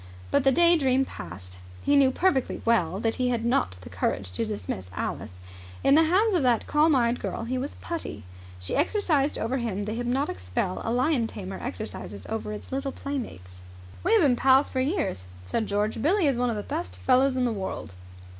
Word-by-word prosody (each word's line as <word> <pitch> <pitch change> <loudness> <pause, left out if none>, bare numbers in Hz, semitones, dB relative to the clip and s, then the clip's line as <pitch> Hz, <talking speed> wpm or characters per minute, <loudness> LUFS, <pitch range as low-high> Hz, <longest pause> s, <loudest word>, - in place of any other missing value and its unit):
But 280 - +3
the 270 - +5
day 340 +4 +5
dream 265 -1 +2
passed. 90 - -9 0.2
He 285 - +3
knew 275 -2 +6
perfectly 270 -1 0
well 195 -6 +2
that 225 +1 -1
he 250 -1 +1
had 235 -2 -1
not 95 - +1
the - - -10
courage 95 -2 -2
to 105 +5 -2
dismiss 95 -3 -5
Alice. 90 - -4 0.4
In 275 - +5
the 320 +2 +6
hands 400 +7 +3
of 350 - +3
that 245 -3 +2
calm 300 0 +3
eyed 240 -1 +2
girl - - -4
he 255 +2 -2
was 275 +3 -4
as - - -17
putty. 335 -1 -5 0.4
She 90 - -4
exercised 305 -4 +1
over 245 +4 -1
him 210 -4 -2
the 215 +1 -3
hypnotic 245 - -1
spell 90 - -2
a 225 - -1
lion 250 0 +2
tamer 195 -3 -7
exercises 215 - -6
over 220 -1 -3
his 210 - -8
little 275 +1 -2
playmates. 95 - -6 0.4
"We - - +3
have 225 - +6
been 265 -4 +4
pals 265 +3 +4
for 260 - -2
years," 265 - -1 0.2
said 215 - -1
George. 210 +2 -1
"Billie 350 - +3
is 270 -4 +2
one 250 0 +2
of 230 - -1
the 205 - -4
best 90 0 -4
fellows 255 - +3
in 255 - +2
the 235 - 0
world." 190 - -5
245 Hz, 205 wpm, -26 LUFS, 190-275 Hz, 0.4 s, knew